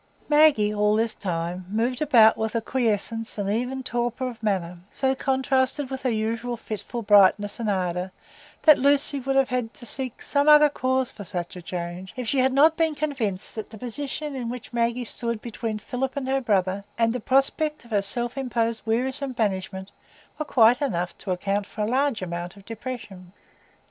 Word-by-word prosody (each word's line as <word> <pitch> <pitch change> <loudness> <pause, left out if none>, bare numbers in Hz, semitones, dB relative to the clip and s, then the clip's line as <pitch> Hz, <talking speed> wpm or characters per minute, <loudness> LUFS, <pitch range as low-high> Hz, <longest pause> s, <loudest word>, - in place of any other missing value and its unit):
Maggie, 295 -9 +5
all 210 0 +2
this 225 0 +1
time, 175 -1 -4
moved 235 +5 -1
about 235 -7 +6
with 220 +1 -3
a - - +3
quiescence 225 -2 -1
and 200 -1 -2
even 250 +4 -2
torpor 240 +1 -2
of 240 -2 -8
manner, 180 -5 -1
so 265 -1 +1
contrasted 265 +1 0
with 265 0 -4
her 255 - 0
usual 230 +2 -2
fitful 220 +2 -5
brightness 205 +1 +4
and 225 -2 -1
ardor, 180 -1 -1 0.5
that 305 -3 +7
Lucy 280 +1 +2
would 270 +1 -2
have 270 0 +3
had 250 -2 -2
to 240 - -9
seek 255 +1 -3
some 285 +1 +2
other 300 0 +8
cause 260 -2 0
for 205 - -9
such 175 -2 -5
a 180 - -8
change, 175 +1 -6
if 250 -2 -5
she 270 - +1
had 260 +1 +3
not 300 +4 +5
been 320 -2 +1
convinced 245 -11 -2
that 220 - -6
the 220 - -11
position 275 +5 -4
in 245 -3 -4
which 245 0 -7
Maggie 235 +1 0
stood 235 0 -3
between 225 -1 -4
Philip 255 +5 -4
and 265 -2 -2
her 270 0 +1
brother, 195 -4 0
and 230 0 +2
the 250 - -2
prospect 275 +4 +1
of 235 - -17
her 205 -2 +2
self 240 +5 -3
imposed 230 -3 -1
wearisome 260 +4 -1
banishment, 190 -3 -2 0.5
were 305 - -2
quite 240 -1 +4
enough 180 -10 -1
to - - -8
account 195 +2 -1
for 215 - -6
a - - +2
large 260 -2 +1
amount 175 +1 -5
of 200 - -15
depression. 215 -6 -8
235 Hz, 190 wpm, -25 LUFS, 205-265 Hz, 0.5 s, other